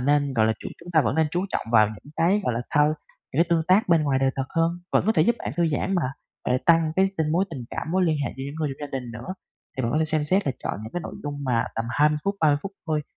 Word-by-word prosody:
nên, 145 +1 +2
gọi 110 -3 +3
là, 110 - +3
chuyện - - -7
chúng 175 +1 -10
ta 155 - +6
vẫn 125 -2 0
nên 160 -1 +3
chú 180 +3 -1
trọng - - -3
vào 110 -2 +6
những 110 +8 -11
cái, 185 +5 +3
gọi 125 - +1
là, 120 - -1
thao 150 0 +4 0.5
những 160 +5 +4
cái - - -3
tương 165 -1 +2
tác 190 +1 +4
bên 165 -2 +4
ngoài 135 -3 +1
đời 135 0 +2
thật 135 - 0
hơn, 165 0 +3 0.2
vẫn - - +3
có 220 - +4
thể 155 - +4
giúp 235 +6 +2
bạn - - -4
thư 170 -1 +3
giãn 190 +6 -1
mà, 175 - +1 0.4
mà - - 0
lại 130 - +3
tăng 165 -2 +5
cái 190 0 +5
tình 155 -1 +1
mối 185 +4 +3
tình 130 -7 -6
cảm, 160 - -4
mối 185 -1 +3
liên 160 -2 +2
hệ - - -3
với 135 - -5
những 140 - -6
người 155 -2 -1
trong 145 - -3
gia 135 - -1
đình 120 -2 -8
nữa. 120 +11 -6 0.4
Thì 130 - -1
vẫn 115 - 0
có 155 - +2
thể 160 - +2
xem 155 -1 0
xét 185 +3 +1
là 135 - +1
chọn - - -1
những 110 - -8
cái 175 - -2
nội - - -7
dung 145 -1 -4
mà 120 -3 +1
tầm 115 - -2
20 150 +1 +3
phút, 200 0 0
30 150 -2 +4
phút 195 - -5
thôi 155 -1 0
155 Hz, 320 wpm, -25 LUFS, 135-170 Hz, 0.5 s, ta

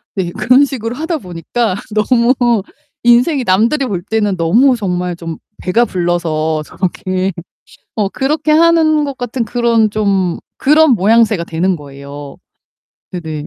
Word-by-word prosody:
네, 180 -3 -2
그런 250 +7 +3
식으로 245 -4 -5
하다 320 +4 -2
보니까 185 - -3 0.2
너무 235 +3 +3 0.7
인생이 250 +4 +3
남들이 230 +9 +2
볼 195 -8 -3
때는 210 -1 -1
너무 230 +11 +3
정말 180 -5 -2
좀 165 -1 -7 0.2
배가 225 +6 +2
불러서 165 -4 -1
저렇게 185 +2 -2 0.6
어 210 -3 0
그렇게 295 +8 -1
하는 315 -1 +4
것 280 -2 -5
같은 245 0 -3
그런 230 -1 +1
좀 195 -4 0 0.2
그런 305 +1 +4
모양새가 215 -3 +3
되는 175 +3 -1
거예요. 140 -1 -10 0.8
네네. 160 -4 -5
215 Hz, 265 characters per minute, -15 LUFS, 175-250 Hz, 0.8 s, 하는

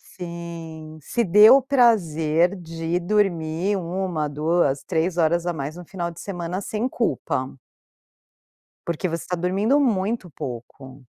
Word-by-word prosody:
Sim. 165 -3 -8
Se 235 - -1
dê 210 +3 +7
o 265 +3 +8
prazer 180 - +3
de 165 +1 -3
dormir 180 -1 0
1h, 175 -3 -2
2h, 150 -1 +1
3h 175 0 -1
a 170 +1 +2
mais 150 0 -5
no 180 - -9
final 170 -1 -4
de 165 - -11
semana, 180 -1 -4
sem 215 +4 -2
culpa. 135 - -2 1.4
Porque 170 +2 -1
você 165 -1 -4
tá 180 - -2
dormindo 195 +11 +2
muito 215 -5 0
pouco. 130 -1 -8
170 Hz, 130 wpm, -23 LUFS, 160-195 Hz, 1.4 s, o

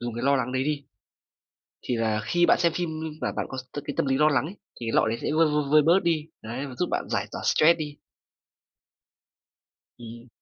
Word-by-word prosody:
dùng 120 -1 -4
cái 120 - -5
lo 140 0 +4
lắng 130 0 -2
đấy 130 +1 0
đi. 145 -2 -2 1.0
Thì 125 - -2
là 110 -1 0
khi 175 +6 +2
bạn - - +4
xem 170 -2 +3
phim 175 -1 -2 0.3
mà - - -2
bạn - - -2
có 130 - -7 0.3
cái 145 - -5
tâm - - +1
lý 135 - +1
lo 150 0 +5
lắng 140 -3 +1
ấy, 170 +6 -7 0.3
thì 115 - -5
cái 115 - -2
lọ - - +3
đấy 115 +1 -2
sẽ - - -1
vơi, 160 +1 +4
vơi, 150 0 +1
vơi 155 0 +7
bớt 170 +5 +4
đi. 160 -3 0 0.2
Đấy, 120 +6 -5
và 130 - -8
giúp 180 - -1
bạn - - -1
giải - - 0
tỏa - - -6
stress 165 +2 +4
đi. 150 -2 -6 2.0
Ừm. 120 +1 -11
145 Hz, 230 wpm, -26 LUFS, 120-155 Hz, 2.0 s, vơi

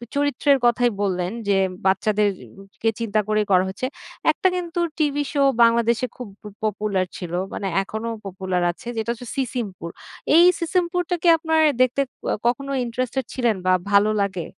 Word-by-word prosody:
চরিত্রের 285 0 +2
কথাই 240 0 +3
বললেন 185 -2 -1 0.2
যে, 200 - +3 0.3
বাচ্চাদেরকে 200 +1 -1
চিন্তা 220 -2 0
করেই 215 0 +1
করা 185 -1 +5
হচ্ছে। 195 +6 -4 0.5
একটা - - +1
কিন্তু 345 -1 -3 0.2
টিভি 290 -2 +1
শো 285 - 0 0.2
বাংলাদেশে 235 +1 +3
খুব 250 - -7
প - - -45 0.2
পপুলার 205 -3 0
ছিল। 175 -2 -7 0.2
মানে 200 - -3 0.2
এখনো 220 +3 -5 0.2
পপুলার 185 -2 -2
আছে। 175 - -14
যেটা 225 +1 -2
হচ্ছে 240 +1 -11
'সিসিমপুর'। 225 -10 -4 0.4
এই 340 - +8 0.2
'সিসিমপুরটা' 355 +1 0
কি - - +2
আপনার 320 0 +1 0.2
দেখতে 255 +2 +3 0.5
কখনো 275 +3 -1
ইন্টারেস্টেড 255 +2 -2
ছিলেন 240 -4 +1
বা 185 - +4 0.2
ভালো 200 +1 +5
লাগে? 190 -4 -2
230 Hz, 150 wpm, -22 LUFS, 195-275 Hz, 0.5 s, এই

